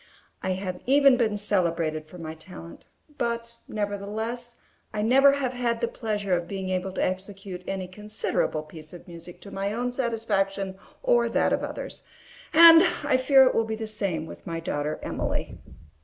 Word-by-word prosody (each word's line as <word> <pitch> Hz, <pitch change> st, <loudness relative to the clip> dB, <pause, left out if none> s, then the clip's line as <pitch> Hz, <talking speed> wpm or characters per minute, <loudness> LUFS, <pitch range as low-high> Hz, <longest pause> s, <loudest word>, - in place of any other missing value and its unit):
I 185 Hz, -, 0 dB
have 185 Hz, -1 st, -5 dB
even 275 Hz, 0 st, +6 dB
been 225 Hz, -4 st, +1 dB
celebrated 170 Hz, -6 st, 0 dB
for 180 Hz, -, -12 dB
my 160 Hz, -2 st, -6 dB
talent; 170 Hz, +1 st, -12 dB, 0.3 s
but, 235 Hz, 0 st, -2 dB
nevertheless, 215 Hz, +4 st, -4 dB, 0.3 s
I 210 Hz, -1 st, -2 dB
never 270 Hz, +5 st, +6 dB
have 265 Hz, -3 st, -1 dB
had 240 Hz, -2 st, -1 dB
the 235 Hz, -, 0 dB
pleasure 210 Hz, -5 st, -2 dB
of 175 Hz, -1 st, 0 dB
being 190 Hz, -1 st, -4 dB
able 185 Hz, +1 st, -1 dB
to -, -, -1 dB
execute 190 Hz, 0 st, -5 dB
any 190 Hz, -1 st, -3 dB
considerable 210 Hz, -5 st, -1 dB
piece 155 Hz, +1 st, -10 dB
of 175 Hz, -, -12 dB
music 170 Hz, 0 st, -10 dB
to 200 Hz, -, -10 dB
my 195 Hz, +1 st, -2 dB
own 245 Hz, +2 st, -1 dB
satisfaction 200 Hz, -6 st, -1 dB, 0.2 s
or -, -, +3 dB
that -, -, +2 dB
of -, -, +1 dB
others; -, -, -6 dB, 0.5 s
and 330 Hz, 0 st, +10 dB, 0.2 s
I 290 Hz, -2 st, +2 dB
fear 265 Hz, +1 st, +6 dB
it 255 Hz, -, +3 dB
will 225 Hz, -, +2 dB
be 220 Hz, 0 st, -3 dB
the 220 Hz, 0 st, -5 dB
same 200 Hz, -7 st, -2 dB
with -, -, -11 dB
my 165 Hz, 0 st, -3 dB
daughter 150 Hz, -2 st, -2 dB
Emily. -, -, -3 dB
205 Hz, 170 wpm, -26 LUFS, 180-235 Hz, 0.5 s, and